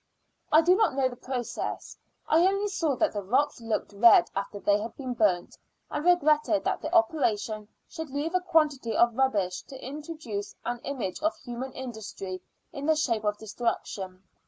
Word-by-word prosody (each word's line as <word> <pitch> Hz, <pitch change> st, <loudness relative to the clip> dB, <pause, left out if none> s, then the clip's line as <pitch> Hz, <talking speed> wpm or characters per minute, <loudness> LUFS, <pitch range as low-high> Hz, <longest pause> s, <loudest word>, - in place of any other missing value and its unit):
I 315 Hz, +2 st, +7 dB
do 360 Hz, +3 st, +5 dB
not 430 Hz, -8 st, +2 dB
know 270 Hz, -1 st, +3 dB
the 245 Hz, -, -9 dB
process. 250 Hz, -1 st, -4 dB, 0.3 s
I 330 Hz, +4 st, +5 dB
only 395 Hz, +2 st, 0 dB
saw 320 Hz, -8 st, 0 dB
that 320 Hz, +4 st, +1 dB
the 205 Hz, -, -2 dB
rocks 245 Hz, +7 st, +1 dB
looked 225 Hz, -2 st, -2 dB
red 200 Hz, -4 st, +6 dB
after 200 Hz, +1 st, -3 dB
they 205 Hz, +1 st, +3 dB
had 220 Hz, +2 st, -6 dB
been 260 Hz, -3 st, -4 dB
burnt, 195 Hz, -7 st, +1 dB, 0.4 s
and 295 Hz, -, -2 dB
regretted 310 Hz, -3 st, +3 dB
that -, -, -1 dB
the 310 Hz, -, -4 dB
operation 240 Hz, -, +1 dB, 0.2 s
should 320 Hz, -3 st, -7 dB
leave 290 Hz, +5 st, -2 dB
a 365 Hz, -, +2 dB
quantity 305 Hz, -9 st, +1 dB
of 235 Hz, 0 st, +4 dB
rubbish 205 Hz, -8 st, +1 dB
to 265 Hz, -, -10 dB
introduce 290 Hz, -7 st, -6 dB
an 240 Hz, 0 st, -2 dB
image 245 Hz, -8 st, -4 dB
of 320 Hz, +2 st, +1 dB
human 245 Hz, +2 st, -6 dB
industry 215 Hz, -7 st, -6 dB, 0.3 s
in 280 Hz, +1 st, -4 dB
the 315 Hz, -, +4 dB
shape 230 Hz, -8 st, 0 dB
of 210 Hz, 0 st, +1 dB
destruction. 200 Hz, -4 st, -4 dB
260 Hz, 175 wpm, -28 LUFS, 215-310 Hz, 0.4 s, I